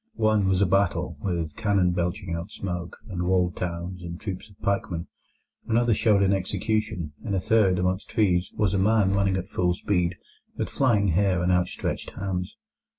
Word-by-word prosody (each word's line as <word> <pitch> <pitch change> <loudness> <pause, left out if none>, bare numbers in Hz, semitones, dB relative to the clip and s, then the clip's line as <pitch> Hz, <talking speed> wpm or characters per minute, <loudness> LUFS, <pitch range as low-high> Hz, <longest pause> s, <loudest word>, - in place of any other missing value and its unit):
One 110 -2 +3
was 95 +1 +3
a - - +4
battle, 95 +1 +1
with 85 -5 -2
cannon 100 -5 +2
belching 90 +1 -2
out 85 +4 -4
smoke, 90 -4 -5
and 90 -4 -4
walled 90 -1 +2
towns, 90 +1 -4
and 85 -1 -7
troops 95 0 -6
of 100 - -21
pikemen. 90 -4 -1 0.6
Another 115 +1 +3
showed 105 -2 +3
an 100 0 +3
execution. 100 -3 -1
In 100 -3 -2
a - - +2
third, 100 -2 +3
among 90 +1 +1
trees, 90 -6 +1
was 105 -4 +1
a 100 - +2
man 100 -1 +3
running 100 -1 +2
at 95 0 -4
full 90 -3 0
speed, 90 -2 0 0.4
with - - -2
flying 105 -7 +2
hair 90 0 +2
and 90 - +2
outstretched 90 0 -1
hands. 90 -2 -3
95 Hz, 175 wpm, -26 LUFS, 90-100 Hz, 0.6 s, a